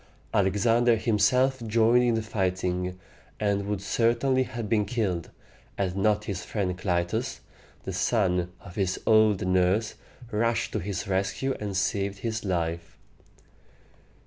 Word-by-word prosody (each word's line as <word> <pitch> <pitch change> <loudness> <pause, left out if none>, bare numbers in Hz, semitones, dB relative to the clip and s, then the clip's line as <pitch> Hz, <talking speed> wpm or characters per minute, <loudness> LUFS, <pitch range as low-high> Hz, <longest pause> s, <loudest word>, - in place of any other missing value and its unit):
Alexander 115 +5 +3
himself 125 +4 +2
joined 115 +2 +4
in 120 -2 +2
the 110 - -1
fighting, 90 -3 -2 0.4
and 100 -1 0
would 100 -2 -2
certainly 120 +5 +2
have 120 -3 -4
been 105 0 +2
killed 100 -6 -2 0.5
had 95 -2 -1
not 105 +1 +2
his 100 -4 -4
friend 95 -4 -2
Clytus, 90 -1 -1 0.4
the 95 - -5
son 90 -2 +1
of 95 -3 -11
his 95 -1 -1
old 110 -4 +4
nurse, 95 +4 +2 0.4
rushed 115 +2 0
to - - -1
his 95 +1 -4
rescue 100 +8 -1
and 100 -2 -3
saved 100 0 -1
his 110 -1 -3
life. 85 -3 -2
100 Hz, 130 wpm, -27 LUFS, 95-115 Hz, 0.5 s, joined